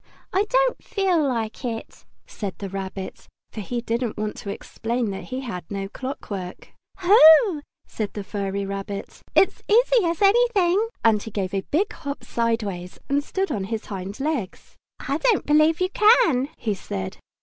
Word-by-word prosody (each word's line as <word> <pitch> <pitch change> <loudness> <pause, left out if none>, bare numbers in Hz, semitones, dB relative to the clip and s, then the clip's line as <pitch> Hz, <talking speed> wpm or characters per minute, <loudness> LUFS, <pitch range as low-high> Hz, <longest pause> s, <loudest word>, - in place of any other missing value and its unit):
"I 390 +2 +2
don't - - +2
feel 375 -5 +1
like 230 -1 -3
it," 230 -2 -6 0.2
said 200 -4 -6
the 200 - -5
Rabbit, 190 0 -6 0.2
for 215 - -6
he 240 +4 -3
didn't 235 -1 -2
want 210 0 -3
to 200 - -7
explain 230 +2 -3
that 195 - -6
he 260 0 -4
had 225 -9 -5
no 195 -1 -3
clockwork. 200 -8 -6 0.3
"Ho!" 355 -2 +7 0.2
said 210 -3 -4
the 205 - -5
furry 200 0 -3
rabbit. 195 0 -6
"It's 390 - +4
as - - -27
easy - - +4
as 335 +3 0
anything," 410 -2 +4 0.2
And 215 -2 +4
he 225 - -7
gave 195 -3 -3
a 195 - 0
big 390 +8 +1
hop 285 -3 -6
sideways 210 -6 -2
and 285 +1 +1
stood 385 +5 -2
on 195 -3 -2
his 220 +2 -4
hind 195 +1 -6
legs. 270 - -3 0.2
"I 280 +3 -2
don't 465 -1 +2
believe 310 +2 +4
you 365 0 +1
can!" 425 - +4
he 215 -3 -1
said. 95 - -5
235 Hz, 170 wpm, -24 LUFS, -, 0.3 s, Ho